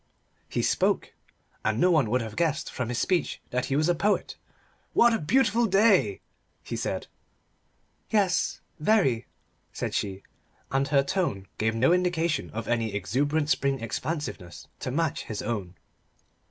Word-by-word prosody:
He - - -1
spoke. - - +1 0.5
And 110 +1 0
no 180 +4 +4
one 150 -10 +3
would 125 +3 +2
have 110 -2 -6
guessed 160 -2 0
from 125 -2 -3
his 125 - -2
speech 180 -2 0
that 125 0 0
he 135 - -1
was 155 +2 +2
a 175 - +4
poet. 205 +5 0 0.6
"What 235 0 +5
a 225 - +1
beautiful 240 - +3
day!" 195 - +4 0.4
he - - -5
said. - - -2 1.0
"Yes, 195 -4 +1 0.2
very," 150 - +2 0.4
said - - -4
she, 95 -1 -2 0.5
and 135 +1 +1
her 140 -2 +3
tone 140 - -1
gave 110 +1 +1
no 130 +9 +4
indication 175 -3 0
of 110 +1 -5
any 115 -3 0
exuberant 145 - 0
spring 140 -1 +1
expansiveness 115 - -5
to - - -4
match 160 +3 -1
his 105 -2 -5
own. 100 -6 -3
140 Hz, 150 wpm, -27 LUFS, 115-175 Hz, 1.0 s, What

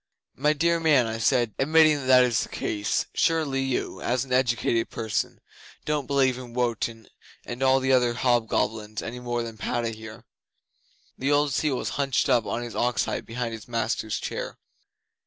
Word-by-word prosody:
'"My 150 +3 +2
dear 170 +3 +1
man," 150 -7 +4
I 110 0 -4
said, 120 -1 +2
"admitting 155 +1 +5
that 135 - -6
that 130 -1 +7
is 125 -1 +1
the - - -5
case, 105 -1 -1
surely 155 -5 +1
you, 135 -1 -2
as 125 +2 0
an 130 - -4
educated 120 -2 +1
person, 110 -1 -3 0.5
don't 150 -3 -1
believe 130 -3 +2
in 120 -2 -10
Wotan 115 -2 -2 0.4
and 120 +2 -6
all 135 0 +4
the 130 0 0
other 125 -2 +3
hobgoblins 110 -3 0
any 125 +2 -6
more 120 -1 -2
than 115 -2 -8
Padda 120 +1 -1
here?" 110 +1 -10 0.9
The 135 +2 0
old 145 -1 +2
seal 150 -1 +1
was - - -3
hunched 135 0 +1
up 120 -3 +3
on 120 - -2
his 120 - -7
ox 120 -3 +1
hide - - -4
behind 115 0 -3
his 110 -2 -9
master's 115 -2 -2
chair. - - -5
125 Hz, 175 wpm, -26 LUFS, 115-135 Hz, 0.9 s, that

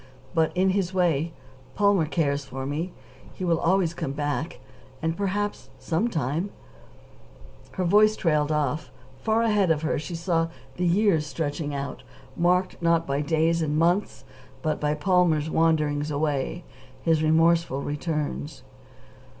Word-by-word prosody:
But, 160 -1 +2
in 190 +1 +3
his 190 -1 -1
way, 165 -3 +1 0.4
Palmer 200 -6 +3
cares 145 -3 0
for 135 0 -6
me. 155 +6 -3 0.4
He 185 - -5
will 165 -2 +2
always 175 -1 +2
come 140 -5 -4
back, 145 +2 -3 0.4
and 165 0 -1
perhaps 205 +2 -2
sometime 165 - -1 0.6
" - - -22
Her 185 - -2
voice 210 +4 +5
trailed 150 -5 +1
off. 150 0 -1 0.3
Far 220 +8 +1
ahead 210 -5 +2
of 160 -1 +1
her 160 - 0
she 165 +3 -6
saw 165 -1 0 0.3
the 180 0 0
years 175 -4 +3
stretching 145 -1 -3
out, 140 0 -5 0.3
marked, 180 +2 +1
not 165 -1 +2
by 140 0 -1
days 165 +2 +1
and 150 -1 0
months, 175 +5 +1 0.4
but 155 -1 -1
by 150 0 +1
Palmer's 160 -1 +2
wanderings 155 -2 +2
away, 150 +2 -1 0.4
his 160 -2 +3
remorseful 160 -2 +3
returns. 145 - -3
160 Hz, 140 wpm, -25 LUFS, 150-180 Hz, 0.6 s, voice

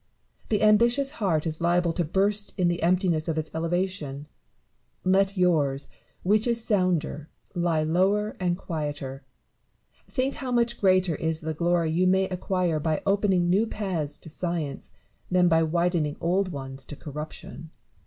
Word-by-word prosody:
The 215 -1 +1
ambitious 235 +6 +4
heart 165 -6 +1
is 160 0 -3
liable 175 0 +2
to 175 - 0
burst 200 +6 0
in 175 -1 +3
the 175 0 -2
emptiness 175 -2 +2
of 160 -1 -1
its 155 0 -3
elevation: 165 -4 -2 0.8
let 195 +1 +2
yours, 145 -7 +1 0.3
which 210 +5 +2
is 235 -1 +2
sounder, 180 -7 0 0.2
lie 170 -3 +1
lower 195 +6 +1
and 175 -1 0
quieter. 145 -6 -5 0.8
Think 265 0 -1
how 260 -2 -5
much 235 -1 +1
greater 185 -3 +3
is 160 +1 -2
the 160 0 -3
glory 170 0 +1
you 180 +3 +2
may 190 +1 +3
acquire 180 -3 -1
by 155 0 -1
opening 195 -3 +2
new 200 +6 +3
paths 180 -10 -3
to - - -10
science, 165 -5 -3 0.4
than 180 -1 +4
by 165 -1 +4
widening 165 -2 0
old 185 +2 0
ones 135 -2 -6
to 145 - -8
corruption. 150 +2 -8
175 Hz, 150 wpm, -26 LUFS, 160-195 Hz, 0.8 s, ambitious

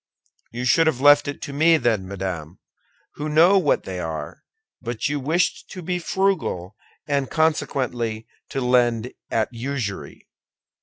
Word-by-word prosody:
"You 120 +2 -4
should 165 +6 +4
have 145 -6 +1
left 145 +1 +6
it 145 - -5
to 140 - -6
me, 160 +3 +5
then, 115 -8 0
madame, 90 -4 -5 0.6
who 150 +1 -3
know 170 +6 +6
what 155 -6 +1
they 95 -1 -5
are; 80 -3 -5 0.4
but 120 0 -2
you 145 +1 -1
wished 160 +6 0
to 185 - -8
be 180 +2 -2
frugal, 175 - -1 0.3
and 140 -2 0
consequently 125 -8 -1 0.2
to 135 - -3
lend 125 -1 +2 0.2
at 110 - 0
usury." 120 -4 -5
130 Hz, 145 wpm, -23 LUFS, 110-155 Hz, 0.6 s, left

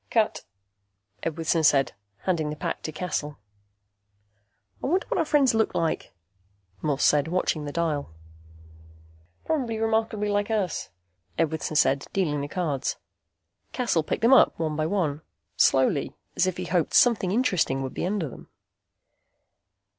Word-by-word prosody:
"Cut," 220 -2 +1 0.8
Edwardson 165 0 0
said, 135 -4 +4 0.3
handing 165 -5 0
the 150 - -4
pack - - -4
to 155 - -5
Cassel. 150 -3 -3 1.5
"I - - 0
wonder 365 +6 +1
what - - 0
our 330 - +2
friends 285 -5 +3
look 220 -1 +1
like," 165 -1 -1 0.7
Morse 145 -3 0
said, 150 0 +4
watching 165 -3 -1
the 145 - -4
dial. 155 - -1 1.4
"Probably 255 -8 -1
remarkably 220 -1 0
like 205 +1 0
us," 205 -7 -1 0.5
Edwardson 160 -1 -1
said, 135 -1 +3
dealing 150 -7 0
the 140 - -3
cards. 150 -5 -2 0.8
Cassel 235 -10 +1
picked 155 - -3
them 240 +4 +6
up 265 - +6
one 155 -2 -2
by 155 +1 0
one, 160 -6 -1 0.3
slowly, - - +2 0.2
as 185 - +2
if 185 - -2
he - - -4
hoped 175 -4 0
something 230 -6 +4
interesting 185 - +1
would 130 - -5
be - - -4
under 185 -2 -1
them. 130 - -12
170 Hz, 140 wpm, -26 LUFS, 150-215 Hz, 1.5 s, them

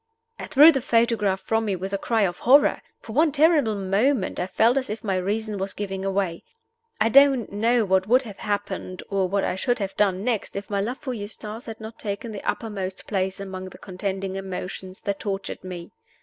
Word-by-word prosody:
I - - -6
threw 300 +3 +8
the 270 -4 -1
photograph 230 -5 +1
from 225 0 0
me 200 -3 0
with 190 +2 -5
a - - +2
cry 225 0 +1
of 175 -3 -1
horror. 275 +4 +5 0.2
For 220 - -9
one 310 +4 +4
terrible 295 -6 +3
moment 200 +4 +1
I 180 - -1
felt 230 +5 +3
as 260 -4 -1
if 215 +2 -5
my 195 -3 0
reason 205 +3 -2
was 195 +1 -2
giving 195 -1 -3
way. 190 -4 -1 0.6
I 220 - +4
don't 270 -2 +5
know 225 +3 +2
what 190 0 +2
would 255 +4 +4
have 210 -5 -10
happened, 200 -3 -3
or 195 -1 +1
what 200 +1 +1
I - - 0
should 245 +6 0
have 195 -3 -4
done 195 -2 +1
next, 230 -3 -2
if 200 +1 -6
my 200 -1 +1
love 240 +6 -3
for 265 -4 -5
Eustace 215 +1 -7
had 225 -1 -7
not 220 +1 -9
taken 205 +2 -4
the 205 - -6
uppermost 195 -4 -4
place 190 -2 -2
among 190 -1 -6
the - - -13
contending 190 0 -4
emotions 190 0 -6
that 200 -1 -2
tortured 195 -2 -4
me. 180 -2 -7
205 Hz, 205 wpm, -24 LUFS, 190-230 Hz, 0.6 s, threw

